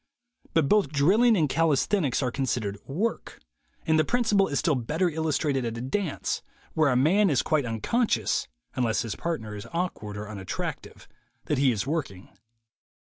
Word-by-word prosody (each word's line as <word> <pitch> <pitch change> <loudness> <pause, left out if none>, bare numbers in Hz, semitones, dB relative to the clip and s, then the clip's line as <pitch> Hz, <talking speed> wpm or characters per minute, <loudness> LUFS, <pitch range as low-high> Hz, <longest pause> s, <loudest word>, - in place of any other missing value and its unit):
But 160 -4 +3
both 210 -3 +3
drill 155 +10 +3
ing 240 -3 +5
and 155 -4 +3
calisthenics 155 - +1
are 125 - 0
considered 120 -6 -2
"work," 200 +12 -3 0.5
and 160 0 +3
the - - +5
principle 210 -1 +2
is 140 - -2
still 160 +1 +2
better 150 +8 0
illustrated 155 -4 0
at 115 -1 -3
a - - -5
dance, 160 +6 -2 0.3
where 155 -2 +3
a 125 - +2
man 180 +10 +4
is 140 -5 +2
quite 150 -5 +1
unconscious 115 - 0 0.3
(unless 115 -3 +1
his 115 -3 -4
partner 110 -11 -4
is 105 +2 -8
awkward 165 - -3
or 105 0 -6
unattractive) 100 -3 -6 0.4
that 150 - 0
he 135 -2 +4
is 110 -2 -2
working. 140 - -4
145 Hz, 165 wpm, -26 LUFS, 120-170 Hz, 0.5 s, ing